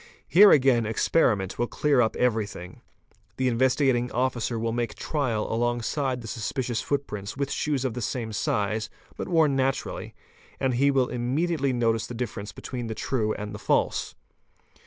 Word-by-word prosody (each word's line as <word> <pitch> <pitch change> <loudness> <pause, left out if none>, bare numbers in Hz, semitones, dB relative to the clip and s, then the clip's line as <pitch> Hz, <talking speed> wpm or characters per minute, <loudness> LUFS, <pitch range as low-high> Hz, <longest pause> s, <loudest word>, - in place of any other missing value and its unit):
Here 205 +4 +8
again 130 - +4
experiment 110 - +1
will 120 - +1
clear 145 -1 +2
up 110 - +1
everything. 110 -7 -2 0.6
The 130 - +1
Investigating 125 0 +2
Officer 125 -2 -1
will 115 0 -1
make 115 -2 -2
trial 130 -8 -1
along 120 +1 0
side 130 -1 -1
the 115 - -8
suspicious 120 +1 -2
footprints 110 -7 -3
with 140 -1 -2
shoes 140 -3 -1
of 125 - -1
the 125 - -5
same 115 -1 -3
size, 110 -4 -1 0.3
but - - -5
worn 160 -5 +3
naturally, 135 0 -2 0.4
and 130 -1 +1
he 135 +4 +3
will 135 -3 +2
immediately 135 +4 0
notice 115 -3 +1
the 120 - -7
difference 105 -4 -4
between 120 +2 -6
the 110 - -4
true 110 -4 -1
and 105 0 -6
the 105 - -7
false. - - 0
120 Hz, 160 wpm, -26 LUFS, 110-135 Hz, 0.6 s, Here